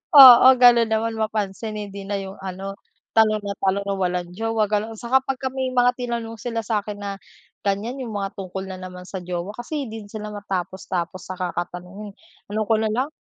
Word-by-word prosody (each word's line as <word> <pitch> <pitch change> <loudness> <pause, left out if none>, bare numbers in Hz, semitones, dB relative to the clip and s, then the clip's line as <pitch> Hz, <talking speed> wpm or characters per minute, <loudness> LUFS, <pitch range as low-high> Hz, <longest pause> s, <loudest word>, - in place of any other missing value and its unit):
Oo 255 -3 +11
ganun 240 -2 +7
naman 225 +1 +1
mapansin 215 0 -2
hindi 200 -1 -7
na 205 - -1
yung 195 0 -7
ano, 195 +1 -5 0.4
tanong 215 -1 +4
ng 200 -1 -5
tanong 195 +1 +1
na 200 - 0
walang 180 -2 -1
jowa 225 0 0
ganun. 215 +2 -1
Saka 255 +2 +2
pagka 265 0 -2
may 260 -1 -2
mga 245 0 +5
tinanong 235 -2 -4
sila 230 +1 -2
sa'kin 210 -1 -2
na 200 -1 -5 0.5
ganyan 205 +6 -1
yung 230 -4 -5
mga 195 -1 -3
tungkol 190 0 -5
na 190 -1 -6
naman 180 0 -8
sa 190 - -5
jowa. 175 +2 -4
Kasi 275 +2 -4
di 220 -1 -7
din - - -16
sila 210 -1 -6
matapos-tapos 185 -2 -4
sa 185 - -6
kakatanong. 180 +3 -5
Eh - - -24 0.4
ano 215 - 0
ko 225 - +4
na 220 - +1
lang, 255 +6 0
210 Hz, 195 wpm, -23 LUFS, 190-230 Hz, 0.5 s, Oo